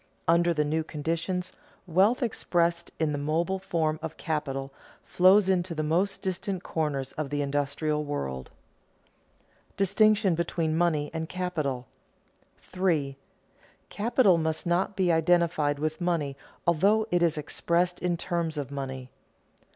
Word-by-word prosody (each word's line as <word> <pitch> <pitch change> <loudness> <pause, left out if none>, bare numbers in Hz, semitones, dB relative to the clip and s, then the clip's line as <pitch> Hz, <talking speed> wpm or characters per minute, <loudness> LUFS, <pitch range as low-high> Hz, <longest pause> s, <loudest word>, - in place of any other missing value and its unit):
Under 170 +1 +4
the 150 -2 +1
new 160 +2 0
conditions, 170 +4 -3 0.3
wealth, 195 +9 +3
expressed 170 -6 0
in 160 -2 +1
the 145 - -2
mobile 165 +6 0
form 160 -5 -1
of 160 -1 -6
capital, 135 -4 -3 0.3
flows 190 +2 +5
into 180 -2 0
the 155 - -1
most 180 +6 0
distant 190 0 -3
corners 145 -4 -2
of 155 -2 -4
the 145 0 -1
industrial 145 +2 -1
world. 65 - -4 1.2
[Sidenote: - - -36
Distinction 200 0 +3
between 165 -1 -1
money 160 -3 +1
and 160 -1 -4
capital] 155 -9 -2 0.8
3. 160 -7 -1 0.8
_Capital 210 -5 +3
must 160 0 -2
not 175 +3 0
be 185 -2 +2
identified 160 -3 +2
with 155 +3 -3
money 165 -6 0 0.3
although 200 +6 +3
it 175 - +2
is 165 -2 +2
expressed 170 +4 0
in 175 -1 0
terms 170 -3 -2
of 140 -1 -4
money. 130 -2 -5
165 Hz, 135 wpm, -27 LUFS, 150-180 Hz, 1.2 s, flows